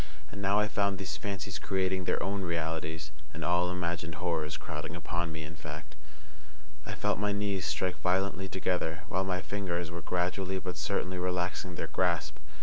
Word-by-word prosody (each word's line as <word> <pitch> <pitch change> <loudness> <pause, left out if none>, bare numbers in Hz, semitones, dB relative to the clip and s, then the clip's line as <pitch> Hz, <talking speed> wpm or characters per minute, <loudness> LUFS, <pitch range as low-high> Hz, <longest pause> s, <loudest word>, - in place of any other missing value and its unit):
And 100 - -5
now 100 +1 +4
I 105 - +4
found 100 -2 +2
these 95 -1 -2
fancies 100 -1 -3
creating 95 -1 +1
their - - +3
own 100 +1 0
realities, 80 -2 -1 0.2
and 80 - -3
all 90 0 +4
imagined 85 -3 -1
horrors 80 -3 0
crowding - - -4
upon 85 0 -1
me 80 0 -4
in 80 +2 -7
fact. 75 -1 -7 0.9
I - - -2
felt - - +1
my 105 0 +2
knees 100 -4 +1
strike 85 +5 0
violently 95 +1 +2
together, 90 -2 0
while 95 - +2
my 90 -1 0
fingers 90 -3 -1
were 85 0 -4
gradually 90 +2 +1
but 90 -1 -3
certainly 90 0 0
relaxing 90 0 0
their - - -1
grasp. 85 -4 +1
90 Hz, 170 wpm, -32 LUFS, 85-95 Hz, 0.9 s, now